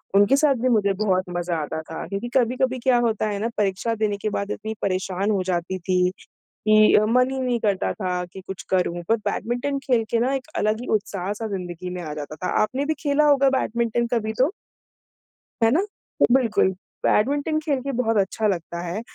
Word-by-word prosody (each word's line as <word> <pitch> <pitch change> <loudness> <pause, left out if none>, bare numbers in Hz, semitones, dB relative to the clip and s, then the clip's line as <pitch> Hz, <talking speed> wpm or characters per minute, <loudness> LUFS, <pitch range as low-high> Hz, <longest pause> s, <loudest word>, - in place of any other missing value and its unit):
उनके 205 +6 +6
साथ 285 -2 +4
भी 255 - +2
मुझे 205 -4 +3
बहुत 185 -2 +1
मज़ा 175 -1 -1
आता 150 +1 -4
था। 160 +1 -7
क्योंकि 200 +4 -4
कभी-कभी 255 +1 +1
क्या 255 -2 +4
होता 215 -1 0
है 205 -1 -2
ना, 230 - -1
परीक्षा 205 +3 0
देने 210 -2 0
के 215 +1 -2
बाद 200 0 -3
इतनी 220 +1 -4
परेशान 190 +1 -1
हो 195 -3 +1
जाती 180 0 -2
थी, 180 0 +2 0.6
कि 215 0 +6
मन 250 +2 +3
ही 265 - -3
नहीं 250 -2 0
करता 200 -3 0
था 180 -3 -2
कि 190 - -8
कुछ 190 -1 -6
करूँ, 175 -2 0
पर 225 - +4
बैडमिंटन 245 +5 -2
खेल 240 -4 +2
के 230 - +2
ना 255 +3 +1
एक 265 -2 -3
अलग 215 +1 +1
ही 245 - -6
उत्साह-सा 205 +1 -4
ज़िंदगी 180 -2 -5
में 180 0 -5
आ 155 -3 -5
जाता 150 0 -6
था, 180 - -4
आपने 255 +6 -1
भी 315 - +1
खेला 295 -1 +2
होगा 275 -1 +5
बैडमिंटन 235 0 0
कभी 220 -2 0
तो? 270 +7 +3 1.1
है 225 - +6
ना? 315 +8 +3 0.5
बिल्कुल, 240 -7 +3 0.4
बैडमिंटन 285 +7 +2
खेल 295 -3 -1
के 275 +2 -3
बहुत 230 -3 0
अच्छा 210 +2 +1
लगता 170 -3 -2
है। 180 +5 -4
215 Hz, 195 wpm, -23 LUFS, 185-250 Hz, 1.1 s, उनके